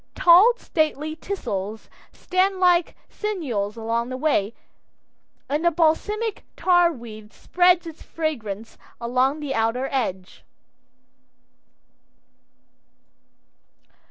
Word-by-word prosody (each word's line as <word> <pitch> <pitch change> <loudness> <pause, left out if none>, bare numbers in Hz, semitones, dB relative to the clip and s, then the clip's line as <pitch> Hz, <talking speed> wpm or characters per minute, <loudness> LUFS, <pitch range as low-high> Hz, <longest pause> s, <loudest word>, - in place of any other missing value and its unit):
Tall, 375 +7 +6
stately 310 - -1
teasels 220 - -5 0.2
stand 375 +1 0
like 355 -2 +3
sentinels 250 - -3
along 230 +2 -2
the 255 - -4
way, 240 -7 0 0.9
and 295 +3 -1
the 345 - +5
balsamic 380 +7 0
tarweed 240 - +1
spreads 355 +3 +2
its 325 -1 -10
fragrance 230 -10 -5 0.2
along 255 +5 0
the 285 -2 -3
outer 225 +3 0
edge. 190 -9 -3
300 Hz, 85 wpm, -23 LUFS, 230-350 Hz, 0.9 s, Tall